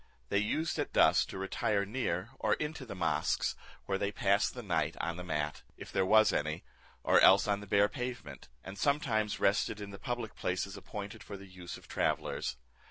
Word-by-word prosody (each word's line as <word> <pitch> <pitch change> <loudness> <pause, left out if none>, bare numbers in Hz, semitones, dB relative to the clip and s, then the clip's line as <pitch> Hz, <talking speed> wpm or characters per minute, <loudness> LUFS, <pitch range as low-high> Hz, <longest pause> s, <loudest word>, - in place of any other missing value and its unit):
They 100 - +2
used 155 +11 -1
at - - -2
dusk - - +5
to - - -6
retire 100 +1 0
near 100 -3 -2
or - - +2
into 150 -3 -5
the 100 - -6
mosques, 90 -3 0 0.3
where 95 -1 -1
they 100 0 0
passed 100 -1 +2
the - - -6
night - - 0
on 85 - -2
the 90 - -6
mat, 75 -3 -2 0.2
if - - -9
there 95 -1 +1
was 110 +1 +6
any, 75 +1 -1 0.4
or - - +5
else 95 +2 +7
on 100 -1 +1
the 105 - -10
bare 100 +1 +4
pavement; 125 - -6
and 95 +1 -8
sometimes 110 -7 +1
rested 105 +1 +2
in 100 -1 -7
the 100 - -9
public 120 -2 -4
places 95 +2 -2
appointed 100 +1 -7
for 100 - -8
the 100 - -11
use 90 -2 -9
of - - -16
travellers. - - -1
100 Hz, 195 wpm, -32 LUFS, 95-110 Hz, 0.4 s, else